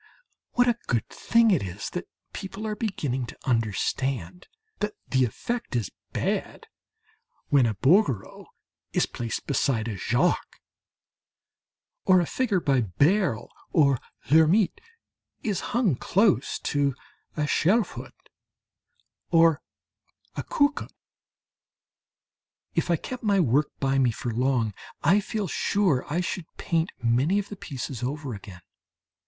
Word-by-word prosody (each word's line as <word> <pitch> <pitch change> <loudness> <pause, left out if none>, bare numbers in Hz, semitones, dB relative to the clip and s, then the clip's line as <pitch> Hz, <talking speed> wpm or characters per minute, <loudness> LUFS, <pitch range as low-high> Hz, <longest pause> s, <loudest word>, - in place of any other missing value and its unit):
What 245 0 +4
a 240 -1 +2
good 120 -4 0
thing 230 -1 +3
it 180 - +3
is 95 +2 -5
that 180 - -5 0.3
people 200 +2 -6
are 215 -1 -2
beginning 145 - -2
to - - -10
understand 130 - -1 0.3
that 210 0 -2
the 130 -1 +3
effect 235 - -4
is 115 -6 -1 0.2
bad - - -2 0.8
when 135 -4 +5
a 110 - -1
Bouguereau 135 - +2 0.5
is - - +3
placed 115 -2 -4
beside 135 -5 0
a 110 - -3
Jacques, 95 - 0 1.4
or 185 -1 +5
a 175 - +1
figure 215 -1 0
by 140 -6 +2
Beyle 140 - +1 0.2
or 140 -6 +4 0.3
Lhermitte 170 - +4 0.6
is 205 -5 0
hung 225 - +2
close 200 - +2
to 140 -3 0 0.4
a - - 0
Schelfhout 195 +9 0 1.0
or 165 -3 +5 0.7
a - - -2
Koekkoek. 285 0 +1 1.8
If - - 0
I 170 - +4
kept 255 +9 -6
my 205 -3 +2
work 145 -2 +3
by 135 0 +1
me 130 -2 +4
for 120 +1 -4
long, 120 -3 +1 0.3
I 190 +5 +5
feel 210 0 -3
sure 165 -7 +1
I 170 +4 +1
should 180 -1 -3
paint 165 0 0
many 130 +11 +3
of 205 - -2
the 205 - -6
pieces 135 - -6
over 140 +1 -3
again. 95 -3 -10
150 Hz, 125 wpm, -26 LUFS, 125-195 Hz, 1.8 s, when